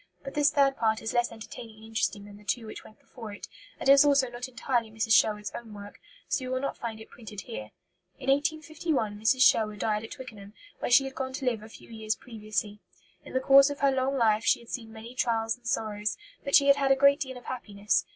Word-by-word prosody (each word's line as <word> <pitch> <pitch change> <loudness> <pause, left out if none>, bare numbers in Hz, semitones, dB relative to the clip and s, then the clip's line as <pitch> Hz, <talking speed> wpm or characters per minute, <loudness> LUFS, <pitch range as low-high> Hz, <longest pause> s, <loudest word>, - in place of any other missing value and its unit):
But 275 - -7
this 290 -1 +4
third 275 -2 +2
part 220 -1 +1
is 225 - -3
less 240 0 +1
entertaining 225 0 -10
and 215 - -16
interesting 210 -2 -2
than 205 0 -12
the 210 - -17
two 225 +3 -2
which 215 - -9
went 215 - -17
before 225 -5 -10
it, 205 - -9 0.3
and - - -3
is 275 +1 +8
also 275 -3 +3
not 245 +2 -6
entirely 240 -2 -1
Mrs. 220 +1 0
Sherwood's 210 -2 +3
own 225 -3 -8
work; 205 0 -11 0.3
so 260 - -1
you 255 - -5
will 255 0 -1
not 275 - -3
find 225 -2 -6
it 220 - -13
printed 215 -4 -9
here. 105 -9 -7 0.5
In 265 - -9
1851 295 -6 -1
Mrs. 255 +4 +4
Sherwood 215 -3 +4
died 210 +1 -1
at 225 - -8
Twickenham, 220 -7 -10 0.3
where - - -2
she 245 +3 +6
had 270 0 -6
gone 260 -1 -4
to 265 0 -5
live 235 -4 0
a 215 - -11
few - - -15
years 220 -1 -2
previously. 215 -3 -4 0.4
In - - -12
the 260 - +2
course 275 +1 +7
of 285 -1 -6
her 280 -1 +4
long 265 +1 0
life 220 -2 +3
she - - +3
had 235 - -16
seen 225 -3 -6
many 225 +2 -10
trials 225 -2 0
and 245 -1 -13
sorrows, 215 -2 -1 0.3
but 280 - +2
she 280 - +6
had 280 0 +6
had 275 -1 +2
a - - +6
great 280 +1 +5
deal 260 -2 -5
of 245 - -13
happiness. 210 -5 -1
235 Hz, 240 wpm, -28 LUFS, 215-270 Hz, 0.5 s, is